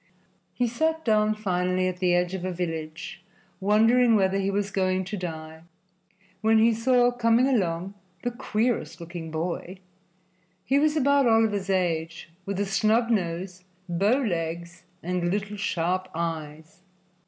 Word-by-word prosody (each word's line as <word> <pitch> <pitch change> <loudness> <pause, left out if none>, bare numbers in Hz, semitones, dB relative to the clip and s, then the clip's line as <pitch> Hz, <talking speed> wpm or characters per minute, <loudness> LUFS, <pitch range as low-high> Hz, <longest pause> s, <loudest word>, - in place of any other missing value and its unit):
He 245 - +1
sat 320 +7 -1
down 215 -1 +3
finally 185 -2 0
at 185 -1 -3
the 180 -1 +2
edge 180 +1 0
of 190 -2 -4
a 185 - -2
village, 165 0 -5 0.4
wondering 225 +4 +4
whether 195 -1 +2
he 195 0 0
was 200 0 -1
going 185 -1 0
to 200 +3 -4
die, 160 -3 -6 0.8
when 220 0 +4
he 225 +1 +5
saw 245 +2 +3
coming 240 +1 +3
along 190 -7 0 0.3
the 245 - -1
queerest 230 -6 -1
looking 170 -1 -7
boy. 170 +3 -4 0.9
He 275 +2 +3
was 305 +1 +2
about 280 -2 +3
Oliver's 220 -4 +2
age, 170 -3 -1 0.2
with 200 -1 -2
a 205 - +1
snub 220 +4 +2
nose, 180 -2 -2 0.2
bow 195 +8 +2
legs 170 -6 -3 0.2
and 175 0 -1
little 205 +2 -2
sharp 185 -1 -1
eyes. 160 0 -5
190 Hz, 140 wpm, -26 LUFS, 175-225 Hz, 0.9 s, he